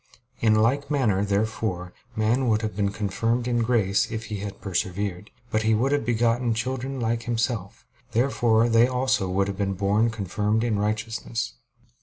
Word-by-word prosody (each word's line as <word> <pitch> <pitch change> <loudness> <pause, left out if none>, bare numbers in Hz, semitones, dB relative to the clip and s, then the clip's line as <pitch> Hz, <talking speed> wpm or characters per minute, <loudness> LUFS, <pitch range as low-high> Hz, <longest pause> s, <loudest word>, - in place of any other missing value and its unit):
In 110 -1 +4
like 125 +7 +2
manner, 115 -10 +2
therefore, 100 -3 -1 0.2
man 115 +4 +1
would 110 -1 +2
have 110 -2 -3
been 100 -1 +1
confirmed 115 +4 -1
in 120 -1 +1
grace 110 -3 +2
if 110 0 -4
he - - -2
had 100 0 -6
persevered. 95 +1 -3 0.2
But 110 - +1
he 110 0 +3
would 130 +6 +1
have 145 -5 0
begotten 120 0 +2
children 130 +3 -3
like 115 0 -1
himself. 115 -4 -2 0.3
Therefore 115 -2 +3
they 115 +1 +5
also 130 -6 0
would 95 +2 +1
have 100 -1 -4
been 100 -1 0
born 105 +4 +2
confirmed 105 +1 -1
in 110 -4 0
righteousness. 110 +2 -2
110 Hz, 165 wpm, -25 LUFS, 100-120 Hz, 0.3 s, they